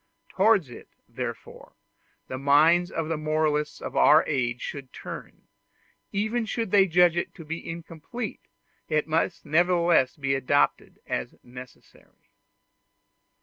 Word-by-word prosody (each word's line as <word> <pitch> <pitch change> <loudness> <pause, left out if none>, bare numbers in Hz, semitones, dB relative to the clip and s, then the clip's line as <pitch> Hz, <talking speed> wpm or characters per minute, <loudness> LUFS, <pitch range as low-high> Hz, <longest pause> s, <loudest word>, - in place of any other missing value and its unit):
Towards 195 - +2
it, - - -12 0.2
therefore, - - -7 0.5
the 130 - -6
minds 155 +6 +4
of 165 -1 -3
the 160 -1 -2
moralists 155 -1 0
of - - -7
our 155 - +6
age 125 -4 -1
should 135 -1 -7
turn; - - -9 0.7
even 220 +3 -1
should 225 -3 -3
they 195 -2 +5
judge 175 -1 +4
it 175 - -3
to 165 - -11
be 165 +2 -6
incomplete, 170 +7 -7 0.5
it 155 -1 0
must 165 +3 -1
nevertheless 170 -3 +3
be 135 -1 -1
adopted 135 +2 0
as - - -4
necessary. 125 0 -15
160 Hz, 125 wpm, -26 LUFS, 145-175 Hz, 0.7 s, our